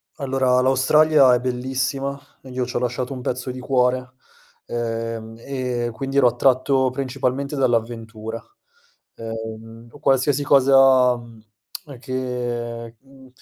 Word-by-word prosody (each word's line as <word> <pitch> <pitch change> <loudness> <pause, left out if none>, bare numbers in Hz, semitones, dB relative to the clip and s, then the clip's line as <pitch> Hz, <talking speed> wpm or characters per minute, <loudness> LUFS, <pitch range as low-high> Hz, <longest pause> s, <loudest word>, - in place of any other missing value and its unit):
Allora, 130 -2 +1
l'Australia 135 +1 +5
è - - 0
bellissima 130 +2 -2 0.2
ed 130 -1 -11
io 130 - 0
c'ho 125 - -3
lasciato 125 +2 -2
un 125 - -7
pezzo 125 0 -3
di 130 - -8
cuore, 125 0 0 0.5
ehm 115 -1 -4
e 125 -2 -3
quindi 135 +4 -4
ero 135 - +5
attratto 130 +2 +2
principalmente 135 +1 -2
dall'avventura, 115 -3 -2 0.7
ehm, 115 0 -8
o 145 - -15
qualsiasi 135 0 +2
cosa, 135 -2 +5
mhmm, 115 -2 -14 0.5
ehm, 140 -4 -11
che 120 -3 -4
mhmm, 135 -1 -18
125 Hz, 120 wpm, -22 LUFS, 120-135 Hz, 0.7 s, l'Australia